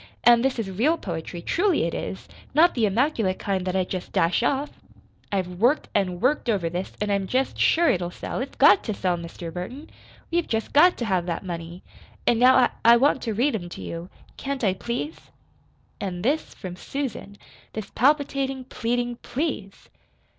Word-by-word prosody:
An' 240 -1 +7
this 265 0 0
is 210 -4 -3
REAL 265 - +2
poetry 170 - -6
truly 370 -1 +2
it 165 - -1
is! 190 - -5 0.3
not 340 +3 +6
the 225 -4 +2
immaculate 220 -3 +1
kind 190 -2 -2
that 185 - -1
I 190 - +2
jest 180 0 -5
dash 170 +6 +2
off! 275 +4 0 0.6
I've 180 -3 -2
worked 250 +8 +2
an' 185 -3 0
worked 255 +2 +1
over 185 -7 0
this, 180 +2 -4
an' 210 0 -1
I'm 200 -1 0
jest 260 +4 -1
sure 340 +1 +4
it'll 175 - +1
sell, 180 - -5
It's 270 - -6
GOT 205 - +6
to 215 - -1
sell, 180 -2 0
Mr. 170 0 -7
Burton. 245 - -7 0.4
We've 340 0 +1
jest 225 -1 -2
got 350 +5 +6
to 240 - -2
have 185 -4 0
that 170 +2 -3
money. 170 0 -6 0.4
An' 235 - +3
now, 255 +1 +7
I 250 -2 +5
I 235 +1 +8
want 270 +1 +3
to 225 -3 -3
read 265 +7 +2
'em 175 -5 -4
to - - -8
you. 170 +2 -6 0.3
Can't 275 -2 -4
I, 195 -3 +3
please?" 240 +10 -4 0.8
And 180 -2 -4
this 290 +7 0
from 185 -2 -7
Susan 240 -2 -5 0.4
this 215 -2 -6
palpitating, 270 -1 +1
pleading 245 -1 -2
"please"! 245 -10 -4
220 Hz, 185 wpm, -25 LUFS, 185-270 Hz, 0.8 s, I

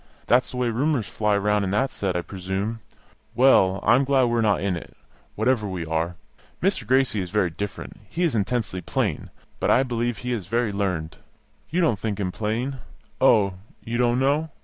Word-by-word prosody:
That's 125 +2 +3
the 125 - -7
way 125 -1 +1
rumours 125 -1 0
fly 105 -1 +1
round 105 0 +1
in 95 - -1
that 130 +8 +1
set, 95 -3 -2
I 90 - -1
presume. 95 +4 -4 0.6
Well, 100 -7 +5
I - - +5
am 130 +3 +4
glad 135 -1 +3
we 120 -1 +1
are - - +3
not 105 -3 +2
in 95 -2 -1
it, 85 - -9 0.4
wherever 125 -5 +1
we 90 -4 -4
are! 80 +2 -1 0.4
Mr. 180 - 0
Gracie 130 -4 +2
is 90 - -5
very 95 -3 +1
different; 100 +4 -6
he 175 - -2
is 170 - +2
intensely 110 -3 -1
plain, - - -2 0.3
but - - 0
I 130 - +5
believe 120 -2 -2
he 125 +2 -3
is 100 -7 -4
very 115 +1 0
learned. 90 -6 -2 0.5
You 175 +5 +1
don't 135 - +2
think 105 -1 -3
him 95 -2 -1
plain? 115 +7 -2 0.4
Oh, 100 -3 +5 0.3
you 120 +1 -2
don't 120 0 +3
know? 145 +4 +1
110 Hz, 195 wpm, -24 LUFS, 95-125 Hz, 0.6 s, Well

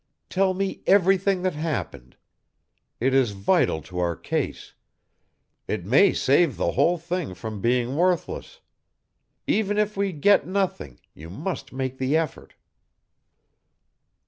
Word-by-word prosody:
Tell 190 0 +2
me 195 0 -3
everything 195 -1 +3
that 185 -2 0
happened. 130 - -5 0.8
It 130 +3 +1
is 130 -6 +3
vital 95 -5 +1
to 90 +2 -7
our 85 -1 0
case; - - -4 0.9
it 85 - -3
may 145 - +5
save 145 +3 +2
the - - 0
whole 175 +1 +2
thing 170 - -4
from 105 +2 -7
being 125 +3 +1
worthless. 185 - -1 0.8
Even 205 -1 0
if 210 0 0
we 200 0 0
get 185 +6 +3
nothing 185 - -2
you 80 +2 -11
must 140 - -5
make 130 0 -4
the 130 +4 +2
effort." 160 -2 -4
155 Hz, 125 wpm, -24 LUFS, 120-190 Hz, 0.9 s, may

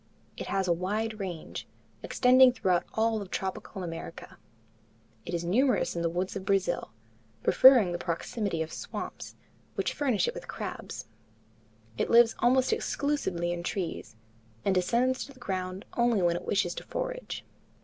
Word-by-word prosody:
It - - -6
has 195 -1 0
a 175 - +4
wide 210 +5 -2
range, 180 -5 -5 0.3
extending 255 +1 +6
throughout 185 -8 +1
all 220 -1 +1
of 195 - -7
tropical 190 +1 -4
America. 165 -6 -7 0.9
It 175 - -2
is 170 - -2
numerous 245 +9 +2
in 170 - -1
the 170 - +1
woods 180 +3 -2
of 195 - -4
Brazil, 190 -2 0 0.5
preferring 250 -8 +7
the 175 - -3
proximity 170 +1 -2
of 160 - -9
swamps, - - -6 0.4
which - - -1
furnish 265 -8 +1
it 475 - -1
with - - -8
crabs. - - -6 0.9
It - - 0
lives 235 -1 +6
almost 255 - +3
exclusively 285 - -1
in 175 0 -3
trees, 175 - -4 0.5
and 195 - +3
descends 240 +8 +1
to 280 - -13
the 255 - -19
ground 185 -3 -4
only 235 -5 +3
when 170 -1 +3
it - - -5
wishes 185 -4 +1
to - - -7
forage. - - -4
195 Hz, 155 wpm, -29 LUFS, 175-245 Hz, 0.9 s, preferring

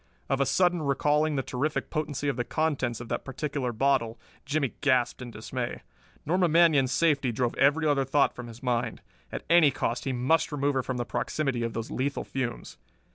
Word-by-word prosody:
Of 135 +1 +1
a 135 - +2
sudden 175 -2 +2
recalling 150 +2 +1
the 135 - 0
terrific 145 +6 -2
potency 145 -3 -2
of 140 - 0
the 120 - -1
contents 135 -6 -1
of 120 - -8
that - - -2
particular 140 -1 -3
bottle, 120 -1 +1 0.3
Jimmie 145 -3 0
gasped 130 -3 +2
in 125 - -6
dismay. 120 +2 -5 0.4
Norma 180 +3 +2
Manion's 155 -5 +4
safety 140 -4 +2
drove 120 +1 -1
every 145 +3 +3
other 145 -2 +3
thought 140 +2 +2
from 125 -1 -8
his 115 +1 -12
mind. 120 -2 -1 0.3
At - - -6
any 170 -3 +6
cost 125 -2 -2
he 135 - 0
must 135 +7 +1
remove 145 -1 0
her 130 - +1
from 130 0 -4
the 120 - -2
proximity 130 +3 -2
of 115 -1 -2
those 115 0 -5
lethal 140 +2 -2
fumes. 125 - -5
135 Hz, 190 wpm, -28 LUFS, 125-150 Hz, 0.4 s, any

